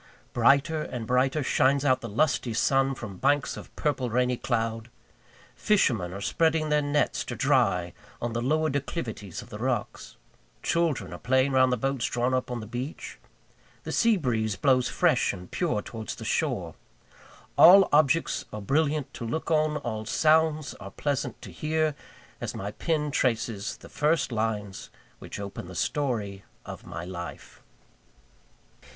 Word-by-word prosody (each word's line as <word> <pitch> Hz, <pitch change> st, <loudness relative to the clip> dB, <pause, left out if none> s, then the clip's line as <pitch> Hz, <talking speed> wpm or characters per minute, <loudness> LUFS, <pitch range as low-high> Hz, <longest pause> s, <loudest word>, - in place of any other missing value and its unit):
Brighter 140 Hz, +6 st, +3 dB
and 120 Hz, -6 st, -5 dB
brighter 130 Hz, +5 st, +1 dB
shines 140 Hz, +1 st, +2 dB
out 130 Hz, -2 st, +3 dB
the 115 Hz, -, -6 dB
lusty 120 Hz, 0 st, 0 dB
sun 135 Hz, +3 st, +2 dB
from 105 Hz, -6 st, -8 dB
banks 145 Hz, +7 st, +1 dB
of -, -, -10 dB
purple, 135 Hz, -4 st, -1 dB
rainy 125 Hz, +2 st, +1 dB
cloud; 115 Hz, -2 st, -2 dB, 0.7 s
fishermen 115 Hz, -, +2 dB
are 100 Hz, +2 st, -7 dB
spreading 160 Hz, +5 st, +1 dB
their 150 Hz, 0 st, +3 dB
nets 145 Hz, 0 st, 0 dB
to -, -, -5 dB
dry 90 Hz, -1 st, +2 dB, 0.3 s
on 120 Hz, -1 st, -3 dB
the 120 Hz, -, -1 dB
lower 155 Hz, +4 st, +1 dB
declivities 125 Hz, -, -4 dB
of -, -, -16 dB
the 105 Hz, -, -8 dB
rocks; 120 Hz, -2 st, -3 dB, 0.5 s
children 170 Hz, -4 st, 0 dB
are -, -, -8 dB
playing 130 Hz, +2 st, +2 dB
round 130 Hz, -1 st, +4 dB
the 125 Hz, -, +1 dB
boats 135 Hz, 0 st, -1 dB
drawn 120 Hz, +1 st, 0 dB
up 130 Hz, -1 st, 0 dB
on 120 Hz, -2 st, -3 dB
the -, -, -7 dB
beach; 120 Hz, +7 st, -6 dB, 0.6 s
the -, -, -5 dB
sea 230 Hz, -2 st, +3 dB
breeze 110 Hz, -, -1 dB
blows 130 Hz, -1 st, +2 dB
fresh -, -, +2 dB
and 90 Hz, 0 st, -10 dB
pure 160 Hz, -, -1 dB
towards 110 Hz, -2 st, -6 dB
the -, -, -9 dB
shore -, -, -1 dB, 0.8 s
all 190 Hz, +2 st, +9 dB
objects 150 Hz, +2 st, +3 dB
are 105 Hz, -, -5 dB
brilliant 145 Hz, +6 st, 0 dB
to -, -, -7 dB
look 160 Hz, +8 st, -3 dB
on, 155 Hz, -1 st, +2 dB
all 110 Hz, -5 st, -4 dB
sounds 155 Hz, -1 st, +2 dB
are 100 Hz, -, -8 dB
pleasant 140 Hz, +6 st, -3 dB
to -, -, -9 dB
hear, 155 Hz, 0 st, 0 dB, 0.5 s
as -, -, -4 dB
my 100 Hz, +1 st, -4 dB
pen 150 Hz, +3 st, -1 dB
traces 115 Hz, -6 st, -1 dB
the -, -, -13 dB
first 150 Hz, -1 st, +1 dB
lines 110 Hz, -3 st, -3 dB, 0.3 s
which -, -, -8 dB
open 100 Hz, -3 st, -6 dB
the 90 Hz, -, -10 dB
story 105 Hz, -, -2 dB, 0.2 s
of -, -, -9 dB
my 85 Hz, 0 st, -6 dB
life. 85 Hz, -1 st, -8 dB
130 Hz, 155 wpm, -27 LUFS, 110-150 Hz, 0.8 s, all